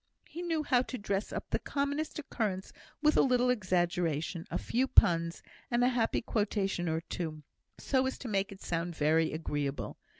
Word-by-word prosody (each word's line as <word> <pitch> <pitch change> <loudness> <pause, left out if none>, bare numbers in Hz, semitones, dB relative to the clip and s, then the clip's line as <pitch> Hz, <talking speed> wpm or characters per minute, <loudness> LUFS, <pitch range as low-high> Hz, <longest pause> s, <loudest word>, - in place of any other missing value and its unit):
He 345 - -7
knew 330 -3 0
how 255 -4 +3
to 255 0 -5
dress 200 -1 -2
up - - -5
the - - +1
commonest 285 +2 -2
occurrence 210 -10 -3 0.3
with 300 0 +5
a - - +7
little 250 -1 +3
exaggeration, 175 - 0
a - - -1
few 255 +3 0
puns, 170 -6 +4 0.3
and 240 0 +2
a 250 - +5
happy 240 -3 +1
quotation 200 -5 0
or 160 0 0
two, 160 -3 -5 0.3
so 260 -1 +1
as 265 - -3
to 260 - -7
make 200 -2 0
it 195 - -11
sound 170 0 -2
very 160 +1 +3
agreeable. 145 -3 -3
195 Hz, 175 wpm, -31 LUFS, 165-250 Hz, 0.3 s, a